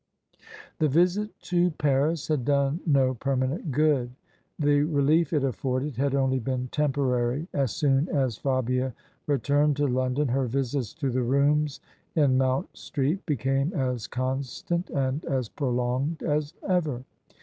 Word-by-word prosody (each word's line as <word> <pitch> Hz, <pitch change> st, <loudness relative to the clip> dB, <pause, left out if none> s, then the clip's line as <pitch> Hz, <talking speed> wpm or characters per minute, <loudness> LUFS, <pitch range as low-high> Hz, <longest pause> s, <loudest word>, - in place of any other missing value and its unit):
The 155 Hz, -, +3 dB
visit 180 Hz, +8 st, +2 dB
to 175 Hz, 0 st, +2 dB
Paris 150 Hz, 0 st, 0 dB
had 150 Hz, -5 st, 0 dB
done 140 Hz, +3 st, +1 dB
no 135 Hz, -3 st, +3 dB
permanent 135 Hz, +5 st, -1 dB
good. 145 Hz, -3 st, +2 dB, 0.5 s
The 145 Hz, -1 st, +3 dB
relief 150 Hz, +1 st, +2 dB
it 150 Hz, -4 st, +1 dB
afforded 130 Hz, 0 st, -2 dB
had 140 Hz, +1 st, +1 dB
only 130 Hz, -1 st, +2 dB
been 130 Hz, +1 st, -3 dB
temporary. 135 Hz, -1 st, 0 dB
As 135 Hz, -5 st, 0 dB
soon 140 Hz, +2 st, +1 dB
as 130 Hz, -7 st, 0 dB
Fabia 130 Hz, 0 st, -1 dB, 0.3 s
returned 145 Hz, +2 st, +2 dB
to 145 Hz, -, +2 dB
London 130 Hz, +2 st, 0 dB
her 130 Hz, +1 st, +1 dB
visits 130 Hz, -1 st, -2 dB
to 140 Hz, -5 st, -2 dB
the 125 Hz, +1 st, 0 dB
rooms 140 Hz, +3 st, +1 dB, 0.3 s
in 145 Hz, -5 st, +4 dB
Moimt 130 Hz, 0 st, 0 dB
Street 150 Hz, +6 st, -2 dB
became 135 Hz, -, 0 dB
as 125 Hz, -, -2 dB
constant 135 Hz, +7 st, -3 dB
and 135 Hz, +2 st, -1 dB
as 130 Hz, -5 st, -1 dB
prolonged 130 Hz, +3 st, -1 dB
as 150 Hz, +1 st, -1 dB
ever. 155 Hz, -10 st, 0 dB
140 Hz, 140 wpm, -26 LUFS, 130-150 Hz, 0.5 s, in